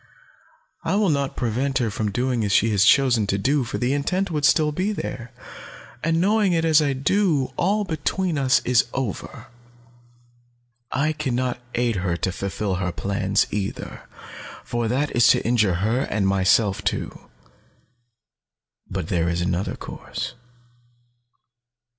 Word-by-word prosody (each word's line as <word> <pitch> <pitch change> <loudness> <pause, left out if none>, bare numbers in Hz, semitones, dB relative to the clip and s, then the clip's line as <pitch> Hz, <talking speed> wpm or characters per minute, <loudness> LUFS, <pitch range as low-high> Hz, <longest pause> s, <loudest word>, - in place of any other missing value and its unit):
I - - 0
will 205 -4 +2
not 140 -2 -1
prevent 130 +3 -1
her 120 -4 0
from 105 +1 -2
doing 125 +2 -1
as 100 - -1
she 110 +3 +3
has 100 -1 +3
chosen 120 -4 +4
to 100 - 0
do, 135 +7 +1
for 115 - -4
the 125 +2 0
intent 180 +7 -1
would 150 -3 0
still 155 -2 +4
be 185 +7 -1
there, 120 - -5 0.7
and 165 +1 +1
knowing 205 0 +2
it 165 -1 +1
as 160 -1 +5
I 145 -2 +1
do, 145 0 +1
all 205 +4 +1
between 175 +1 -2
us 130 -2 +2
is 125 -2 +3
over. 125 -7 -4 1.5
I 155 +4 0
can 145 -5 -2
not 125 0 -1 0.2
aid 120 -3 0
her 90 -2 -1
to 95 - -1
fulfill 100 +1 -3
her 90 -1 -1
plans, 100 +1 0
either, 100 -1 -4 0.6
for 120 -1 -2
that 135 +5 -1
is 120 - +5
to - - +3
injure 110 -6 +2
her 115 +4 +1
and 100 -2 0
myself 95 +1 +2
too. - - -4 1.6
But 90 -4 -4
there 85 -1 0
is 85 0 -1
another 90 +1 -1
course. - - -6
125 Hz, 150 wpm, -23 LUFS, 100-150 Hz, 1.6 s, as